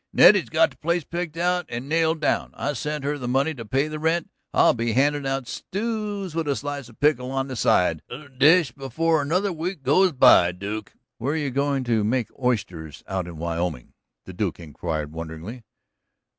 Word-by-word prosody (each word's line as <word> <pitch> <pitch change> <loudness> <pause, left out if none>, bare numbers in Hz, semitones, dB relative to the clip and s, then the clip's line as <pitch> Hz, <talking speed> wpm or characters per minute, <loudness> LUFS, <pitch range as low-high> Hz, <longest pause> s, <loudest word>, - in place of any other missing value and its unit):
"Nettie's - - +6
got 330 - +3
the - - -19
place 170 +1 0
picked 170 0 -5
out 180 +1 0
and 120 +3 -5
nailed 160 0 +1
down - - 0
I 145 - -2
sent 150 +2 -3
her 145 +1 -2
the 125 - -4
money 135 +5 +1
to 120 -5 -8
pay 135 +7 0
the 155 0 -5
rent. 160 +2 0 0.2
I'll - - +5
be 115 -1 -1
handin' 140 +2 +2
out 135 -2 -2
stews 205 - -4
with 165 -2 -2
a 140 - +1
slice 145 -3 -5
of 120 - -19
pickle 140 -4 +2
on 135 0 -2
the 130 - -4
side 90 -7 +2
of 125 - -7
the 140 - -15
dish 145 +3 +4
before 150 +5 0
another 180 +7 0
week 165 -1 -4
goes 185 +8 +4
by, 90 -9 +6
Duke." 100 +3 -6 0.3
"What 120 +4 -2
are 155 - 0
you 145 -3 -2
goin' 140 0 0
to 115 -3 +1
make 120 +3 0
oysters 95 - -2
out 95 -2 -3
of 85 - -8
in - - -10
Wyoming?" 85 -5 -3 0.3
the 95 - -9
Duke 95 -1 -2
inquired 80 -1 -4
wonderingly. 80 +9 -7
135 Hz, 200 wpm, -24 LUFS, 110-160 Hz, 0.3 s, Nettie's